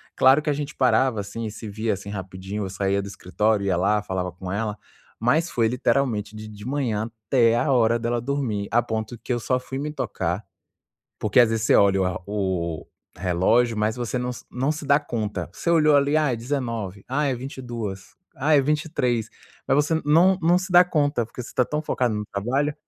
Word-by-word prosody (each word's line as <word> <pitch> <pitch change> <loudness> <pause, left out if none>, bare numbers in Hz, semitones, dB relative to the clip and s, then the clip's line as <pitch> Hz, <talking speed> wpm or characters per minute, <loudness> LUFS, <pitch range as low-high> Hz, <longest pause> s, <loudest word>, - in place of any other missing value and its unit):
Claro 135 +3 +5
que 150 - -2
a - - +2
gente 145 +1 -5
parava, 130 -3 +2
assim, 105 +3 -6
e 110 - -4
se 110 0 -8
via, 110 +2 -1
assim, 100 +1 -7
rapidinho. 95 +1 -5
Eu - - -5
saía 100 +1 0
do 100 - -7
escritório, 100 +2 0
ia 90 -3 +2
lá, 105 +4 +2
falava 95 -2 -2
com 90 +1 -7
ela. 105 +1 -2 0.4
Mas 155 +9 +2
foi 115 -6 +1
literalmente 120 -3 0
de 110 0 -8
de 105 -1 -11
manhã 120 -5 -1 0.2
até 115 -2 +4
a 140 +4 +1
hora 115 -1 +3
dela 120 0 -1
dormir. 120 -6 -2
A 120 +2 +4
ponto 110 0 -4
que 125 - -2
eu 120 - -1
só 125 +4 0
fui 130 +1 -7
me 150 +2 -3
tocar - - -2 0.8
porque, 105 +1 +1
às 120 -2 +5
vezes, 110 -1 -1
você - - +4
olha 100 -1 +4
a 90 0 -4
o 95 -6 -2 0.3
relógio, 100 +6 +2
mas 105 +1 +1
você 120 -1 -2
não 125 0 -2
se 120 - -11
não 135 +4 0
se 155 0 -7
dá 140 +1 +5
conta. 105 - -3
Você 170 - -2
olhou 155 -3 +5
ali, 140 +2 +3
ah, 150 -4 +2
é - - -1
19h, 115 -6 -4
ah, 145 +4 0
é 135 - +1
22h, 120 -7 -6 0.2
ah, 150 +4 +2
é - - +6
23h, 135 -6 0 0.4
mas 135 - +4
você 150 +2 +2
não 170 +6 +5
não 175 +2 +4
se 185 0 -6
dá 175 0 +9
conta. 145 -7 +1
Porque 115 - -10
você - - -11
tá 125 - +3
tão 150 +4 -2
focado 125 -6 0
no 105 0 -3
trabalho, 135 +9 0
115 Hz, 210 wpm, -24 LUFS, 105-140 Hz, 0.8 s, dá